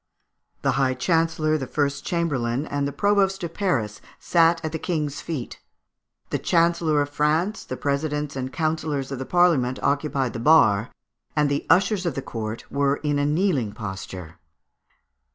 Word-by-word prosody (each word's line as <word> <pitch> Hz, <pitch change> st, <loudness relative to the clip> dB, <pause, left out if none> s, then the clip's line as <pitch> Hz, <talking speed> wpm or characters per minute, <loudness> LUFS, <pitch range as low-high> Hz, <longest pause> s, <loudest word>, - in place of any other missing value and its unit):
The 135 Hz, -, +3 dB
High 130 Hz, -1 st, +2 dB
Chancellor, 160 Hz, +1 st, +1 dB
the 130 Hz, -, -4 dB
First 140 Hz, +1 st, -1 dB
Chamberlain, 140 Hz, -6 st, -1 dB
and 145 Hz, -1 st, -2 dB
the -, -, -3 dB
Provost 195 Hz, +1 st, +1 dB
of 170 Hz, -1 st, -4 dB
Paris, 125 Hz, -, -1 dB, 0.2 s
sat 165 Hz, 0 st, +3 dB
at 160 Hz, -, -2 dB
the 160 Hz, -, -4 dB
King's 150 Hz, -5 st, -2 dB
feet. 150 Hz, -8 st, -5 dB, 0.7 s
The -, -, 0 dB
Chancellor 165 Hz, -3 st, +2 dB
of 145 Hz, -, -7 dB
France, 160 Hz, +9 st, 0 dB
the 130 Hz, -, -6 dB
presidents 145 Hz, 0 st, -2 dB
and 130 Hz, 0 st, -4 dB
councillors 155 Hz, -4 st, -2 dB
of 135 Hz, -, -4 dB
the 130 Hz, -, -5 dB
Parliament, 160 Hz, -8 st, +3 dB
occupied 140 Hz, -3 st, 0 dB
the 115 Hz, -, -4 dB
bar, 115 Hz, -6 st, +4 dB, 0.5 s
and 150 Hz, -1 st, +2 dB
the 140 Hz, 0 st, -2 dB
ushers 190 Hz, 0 st, +3 dB
of 155 Hz, -, -2 dB
the 135 Hz, -, -2 dB
court 110 Hz, 0 st, -5 dB
were 140 Hz, 0 st, +2 dB
in 145 Hz, -1 st, +1 dB
a 145 Hz, -, +1 dB
kneeling 150 Hz, -, +1 dB
posture. 95 Hz, -5 st, -7 dB
145 Hz, 160 wpm, -24 LUFS, 130-165 Hz, 0.7 s, bar